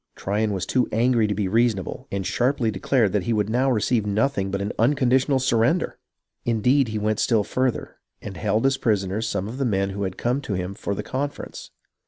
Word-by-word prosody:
Tryon 105 +2 -1
was 95 -2 -2
too 125 -1 +1
angry 115 0 +2
to 105 - -1
be 100 -1 -1
reasonable, 110 -2 0
and 100 -1 -2
sharply 125 0 +1
declared 110 +1 +1
that 100 -2 -1
he 115 - +1
would 105 -1 0
now 130 +3 +2
receive 115 -1 +1
nothing 105 0 0
but 100 0 -2
an 100 +1 -2
un 120 +7 +4
conditional 130 +1 +2
surrender. 130 +6 +1 0.4
Indeed, 120 +4 +2
he 110 0 -3
went 105 0 0
still 110 -4 +2
further, 130 +3 -2 0.2
and 100 -2 -8
held 110 +7 0
as 135 0 +3
prisoners 105 -1 0
some 100 -2 -2
of 120 +5 -7
the - - +1
men 100 -5 0
who 100 +1 -5
had 95 -2 -3
come 125 +4 0
to 105 -8 -3
him 90 +1 -3
for 100 0 -4
the - - -4
conference. 140 +2 -5
110 Hz, 210 wpm, -24 LUFS, 100-125 Hz, 0.4 s, un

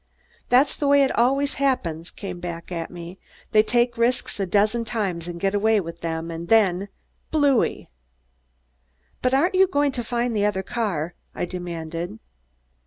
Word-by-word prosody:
"That's 260 +3 +4
the 290 - -1
way 280 0 +6
it 265 - +2
always 275 +4 +2
happens," 170 - 0
he - - -21
came 185 -3 -5
back 170 0 -6
at 165 -2 -3
me; 175 +1 -9 0.3
"they 215 - +6
take 240 +1 +1
risks 240 -2 0
a 195 - 0
dozen 210 +5 +2
times 195 -7 -2
and 170 -1 -6
get 195 +2 0
away 215 +1 +3
with 170 -2 -7
them, 165 0 -3
and 165 +1 -6
then 200 -3 +3 0.4
Blooey!!" 285 -5 +2 1.3
"But 255 +1 +2
aren't 330 +8 +2
you 380 +1 +5
going 290 -5 +1
to 245 -2 -4
find 235 0 -1
the 205 - +1
other 200 -2 0
car?" 185 -7 -2 0.2
I - - -1
demanded. 175 +1 -5
205 Hz, 170 wpm, -24 LUFS, 175-245 Hz, 1.3 s, way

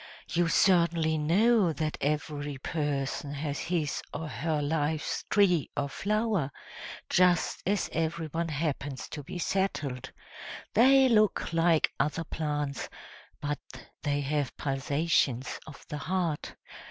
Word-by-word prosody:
You 175 0 +2
certainly 170 -3 +3
know 190 +4 +4
that 155 -1 -2
every 145 -1 -2
person 145 -1 -2
has 145 0 -3
his 165 -5 -1
or 160 +2 -4
her 150 +5 -1
life's 150 +1 -1
tree 180 -7 +3
or 140 0 0
flower, 210 -5 0 0.6
just 180 -2 +3
as 200 0 +1
everyone 165 0 -1
happens 145 -3 -3
to 150 - -6
be 145 - -7
settled; 150 -9 -1 0.6
they 265 +4 +6
look 215 -7 +2
like 165 -1 +3
other 160 +2 0
plants, 150 -3 -3 0.5
but 145 0 -2 0.4
they 145 -1 0
have 145 -1 -1
pulsations 135 -2 0
of 150 - -11
the 150 - -5
heart. 170 -2 -2
155 Hz, 115 wpm, -29 LUFS, 145-175 Hz, 0.6 s, they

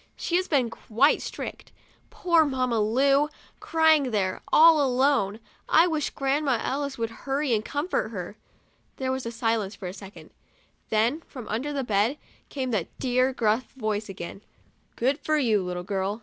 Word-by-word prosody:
She 345 - -2
has 370 +1 -1
been 255 -7 +1
quite 245 +8 +2
strict. - - -7 0.4
Poor 340 -3 +3
Mamma 255 -5 0
Lu! 275 +7 +3 0.3
crying 320 -3 +3
in - - -4
there, 190 -3 -1
all 320 -1 +7
alone. 255 -6 +2 0.3
I 325 - +6
wish 315 -4 -1
Grandma 275 -1 0
Ellis 280 +1 -2
would 230 -1 -2
hurry 275 +2 -2
and 215 -1 +1
comfort 290 -3 -2
her. 195 -2 -6 0.6
There 260 -1 -2
was 260 -2 -3
silence 225 -3 -1
for 185 - -7
a 180 - -6
second, 195 0 -12 0.6
then, 230 +8 +1
from 250 -5 -9
under 245 +8 -2
the 280 -2 -2
bed, 220 +4 +1 0.3
came 260 -3 -3
that 195 -7 -3
dear, 255 0 +1
gruff 230 -1 0
voice 215 -4 -3
again, 190 +1 -7 0.3
" - - -40
Good 270 +5 0
for 310 0 0
you, 225 -8 +2
little 180 -1 -4
girl?' 195 +2 -2
255 Hz, 165 wpm, -26 LUFS, 215-285 Hz, 0.6 s, all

